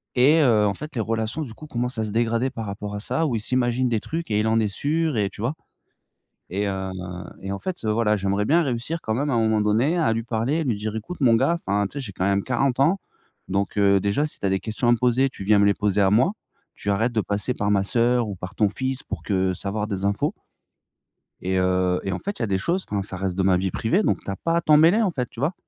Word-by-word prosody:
et 145 +6 +5
heu, 110 -7 +4
en 100 - 0
fait, 150 +7 -8
les 115 - 0
relations 115 +5 -2
du 125 -7 -6
coup 155 - -12
commencent 125 -2 -3
à 110 - 0
se 105 - -5
dégrader 115 +3 +1
par 115 -4 -5
rapport 100 +1 -5
à - - -3
ça 160 +9 -1
ou 125 - -1
il 110 - -1
s'imagine 125 +1 +1
des 115 - +1
trucs 165 +1 -5
et 105 - +2
il 110 - +1
en 115 +1 +3
est 110 - +1
sûr 150 +4 -1
et 100 -2 +1
tu 100 - -11
vois? 125 +7 -1 1.0
Et 100 +3 -1
heu, 95 -1 -3 0.5
et 95 - -5
en 100 - -3
fait, 185 -9 -5
heu, 110 - +1
voilà, 105 -1 +2
j'aimerais 100 +1 0
bien 165 +6 +4
réussir 135 +5 -2
quand 110 - -1
même 145 +5 -1
à 125 - +1
un - - +2
moment 110 -1 +2
donné 115 +10 +2
à 115 -9 +2
lui 115 - -1
parler 120 +6 -1
et 165 - -1
lui 120 -7 0
dire: 105 +1 -4
«Écoute 150 +10 -6
mon 120 -4 +5
gars, 165 +9 +3
enfin 100 - -1
tu - - -16
sais, 145 - -3
j'ai 115 -8 -6
quand 95 - -2
même 100 0 +2
40 130 +1 0
ans 170 +8 +3 0.5
donc 100 +2 -1
heu, 100 -1 +4
déjà, 100 +10 +1
si - - -10
tu - - -1
as - - +1
des 95 - +1
questions 110 +2 -2
à 120 - +6
me - - +4
poser, 125 +2 +3
tu 100 - -8
viens 105 +1 +4
me 100 - +5
les 100 - +4
poser 105 0 0
à 95 -1 +4
moi. 125 - +3 0.4
Tu 100 - -3
arrêtes 115 +5 +1
de 110 - +1
passer 105 +5 -1
par 100 -2 -1
ma 100 -1 +2
sœur 120 +1 +2
ou 100 - -4
par 90 +3 -8
ton 105 - +3
fils 130 +5 -3
pour - - -6
que 95 -2 0
savoir 105 +3 -3
des 100 -2 -4
infos» 100 0 0 1.1
«et 95 +1 -1
heu, 90 0 +1
et 95 - -2
en 90 - -3
fait, 200 +1 -5
il - - -4
y - - +2
a - - -5
des 95 -1 +1
choses, 175 - -1
enfin 100 -1 -1
ça 95 -1 -6
reste 95 -1 -2
de 95 - +2
ma 95 -1 +4
vie 95 0 -1
privée, 175 - +1
donc - - +1
tu - - -4
as - - -3
pas 165 +10 -1
à 170 - +2
t'en 155 -2 +5
mêler 170 +9 +5
en 195 - +2
fait». 125 -6 -3
Tu - - -13
vois? 150 +7 0
110 Hz, 290 wpm, -24 LUFS, 100-130 Hz, 1.1 s, à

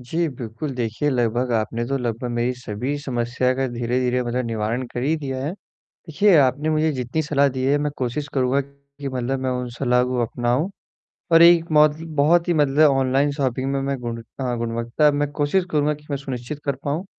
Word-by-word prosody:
जी 160 +7 -1
बिल्कुल, 120 +1 -6
देखिए 120 +3 -1
लगभग 120 0 0
आपने 115 +1 -1
तो 135 - -1
लगभग 120 0 -3
मेरी 120 +1 0
सभी 125 +3 -4
समस्या 125 -2 -1
का 135 +1 -1
धीरे-धीरे 125 +1 0
मतलब 125 +1 -2
निवारण 115 +3 -2
कर 120 - -3
ही 150 +5 +2
दिया 135 -4 -4
है। 145 - -1 0.4
देखिए, 180 +4 +1
आपने 145 +2 +2
मुझे 155 0 +2
जितनी 125 +4 -2
सलाह 140 -2 +2
दी 130 -1 -4
है 140 +2 +3
मैं 150 0 -1
कोशिश 130 +3 -2
करूँगा 130 +1 +2
कि 140 0 -10
मतलब 130 +1 -2
मैं 130 - -1
उन 125 -1 -2
सलाह 125 -2 +2
को 125 -1 -1
अपनाऊँ 120 - -1 0.6
और 165 0 +8
एक 170 -1 +6
मौजती 150 +1 +4
बहुत 165 +4 +3
ही 175 - +3
मतलब 150 0 +4
ऑनलाइन 135 +1 +2
शॉपिंग 135 -2 -1
में 140 - 0
मैं 140 0 -1
गुणता 120 +2 -4
गुणवत्ता 115 +5 0
अब 145 - +1
मैं 145 0 0
कोशिश 150 +6 +1
करूँगा 150 0 +1
कि 150 0 -17
मैं 140 - 0
सुनिश्चित 135 0 -6
कर 140 -2 -1
पाऊँ। 150 +5 -2
135 Hz, 195 wpm, -22 LUFS, 125-145 Hz, 0.6 s, और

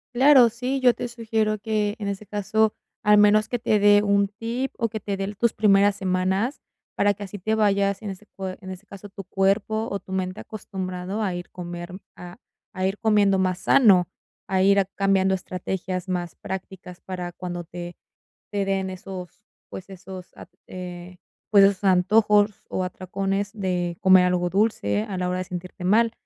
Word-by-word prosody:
Claro, 265 -1 +7
sí, 250 +4 -2
yo 250 -2 +5
te - - -5
sugiero 220 -2 -1
que, 210 0 -1
en 205 - -4
ese 200 +1 -4
caso, 215 +2 +1 0.3
al 210 0 +5
menos 210 +1 +5
que 245 - -2
te 215 -2 +2
dé 205 0 +6
un 200 -1 +2
tip 230 +5 -4
o 230 - 0
que 220 -1 -6
te 200 0 -3
dé 195 +2 -4
tus 235 +3 +2
primeras 205 -1 +3
semanas, 190 +6 -1 0.3
para 205 0 +3
que 205 - -9
así 200 +1 -7
te 215 +3 -2
vayas, 200 -2 +2
en 210 -3 -4
ese 195 +2 -11
cue 190 -1 -5
en 185 - -9
ese 185 +2 -10
caso, 200 +1 -11
tu 195 -1 -10
cuerpo 200 +3 0
o 200 - -2
tu 190 - -10
mente 185 +1 -2
acostumbrado 190 -1 -5
a 190 -4 -1
ir 175 0 -7
comer 175 0 -7 0.2
a 175 +1 -10 0.4
a 185 -2 -2
ir 195 +2 -2
comiendo 205 -3 +3
más 185 -1 0
sano, 190 -6 +5 0.4
a 190 -1 +1
ir 200 +1 +5
cambiando 195 -1 +2
estrategias 185 0 -4
más 175 -2 -3
prácticas 185 -1 -8
para 180 -2 -6
cuando 175 -1 -6
te 175 +1 -8 0.5
te 200 -1 -1
den 195 -1 -1
esos, 185 +1 -9 0.2
pues, 190 - -9
esos, 190 -1 -10
at - - -12 0.2
eh, 180 0 -8 0.3
pues 200 -2 +7
esos 200 +1 +2
antojos 205 +2 +3
o 185 - -2
atracones 195 +2 -3
de 180 -4 -2
comer 185 -2 +6
algo 180 -1 +1
dulce 210 +1 +1
a 205 -4 -5
la 180 0 -1
hora 180 - -1
de 185 - -2
sentirte 180 0 -7
mal. 225 +4 +4
195 Hz, 185 wpm, -24 LUFS, 185-210 Hz, 0.5 s, Claro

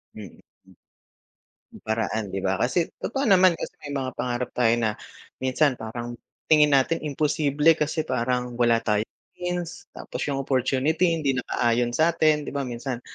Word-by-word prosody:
Mm. 105 -5 -11 1.4
Paraan 110 -1 -2
di 95 - -3
ba, 95 0 0
kasi 165 +7 0
totoo 270 +5 -2
naman 185 -6 +5
kasi - - -6
may 145 -2 -6
mga 130 -1 -2
pangarap 125 0 -2
tayo 120 -2 +3
na 115 -2 0 0.5
minsan 130 +1 +1
parang 120 +1 -6 0.3
tingin 150 -1 +7
natin 140 +5 +2
imposible 150 +1 +2
kasi 155 +1 0
parang 125 0 -2
wala 115 -1 +3
tayong 105 0 0 0.3
means 180 0 -4
tapos - - -7
yung 135 -1 -1
opportunity 140 +7 +1
hindi 145 -4 0
nakaayon 120 -1 0
sa'tin. 155 -2 +3
'Di - - -6
ba, 140 -2 -3
minsan, 120 +1 -4
130 Hz, 145 wpm, -25 LUFS, 120-155 Hz, 1.4 s, tingin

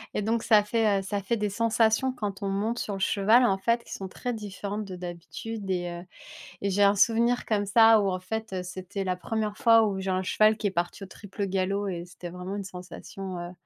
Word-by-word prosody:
et - - 0
donc 225 +1 0
ça 215 -2 +5
fait, 210 -2 +2
heu, - - -3
ça 200 +1 -2
fait 230 +4 0
des 210 -1 -1
sensations 225 +3 +2
quand 205 -4 -5
on 195 - -1
monte 215 +5 -1
sur 205 - -3
le 195 - -6
cheval 215 +6 +4
en 195 -5 +2
fait 230 +4 0
qui - - -8
sont 195 - -5
très 245 +5 -4
différentes 205 0 -5
de 185 - -7
d'habitude 185 +4 -7
et 175 -1 -1
heu 175 +1 -8 0.6
et 200 - 0
j'ai 200 +2 +3
un 200 +1 +5
souvenir 235 +4 +3
comme 205 -2 0
ça 225 +2 +6
où 195 - +1
en 185 - -2
fait, 220 +2 -5
heu, 180 -1 -2
c'était 185 +2 -5
la 185 -1 0
1re 215 +1 -3
fois 230 -1 +6
où 195 -2 -2
j'ai 190 - -3
un 185 0 0
cheval 215 +3 +4
qui 210 - -1
est - - -2
parti 175 +2 -3
au - - -7
triple 200 +1 -6
galop 195 +2 -1
et 175 -3 -4
c'était 180 0 -9
vraiment 180 +2 -6
une 200 - -4
sensation, 185 0 -8
heu, 175 0 -6
200 Hz, 240 wpm, -27 LUFS, 185-220 Hz, 0.6 s, ça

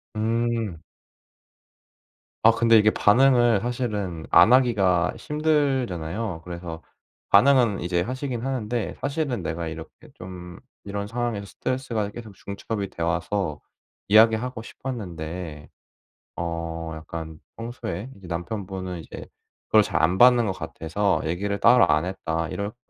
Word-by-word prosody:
음. 115 -3 -1 1.7
아 115 - +8
근데 115 0 +4
이게 110 0 +5
반응을 120 -1 +4
사실은 105 -9 -3
안 90 +8 +7
하기가 100 -10 +3
힘들잖아요. 120 - -1
그래서 85 -2 -7 0.5
반응은 120 -1 +5
이제 85 0 0
하시긴 130 +3 -3
하는데 120 -4 -2
"사실은 140 - -2
내가 85 0 -3
이렇게 80 0 -7 0.2
좀 90 -1 -9 0.3
이런 100 0 -4
상황에서 115 -3 -3
스트레스가 115 -2 -3
계속 110 -4 -10
중첩이 100 +1 -5
돼 85 - -9
와서 85 -1 -1 0.5
이야기하고 110 +3 +4
싶었는데 85 - -6 0.7
어 85 -1 -4
약간 80 0 -7 0.2
평소에 115 -1 -6
이제 95 - -12
남편분은 90 +1 -5
이제 - - -9 0.4
그걸 110 - +6
잘 85 -4 -1
안 90 +4 +2
받는 120 -2 +6
것 95 - 0
같아서 95 +2 -1
얘기를 100 +5 -2
따로 115 -6 +6
안 80 - +3
했다." 80 -3 -3
이렇게 100 +2 -4
100 Hz, 280 characters per minute, -24 LUFS, 85-120 Hz, 1.7 s, 아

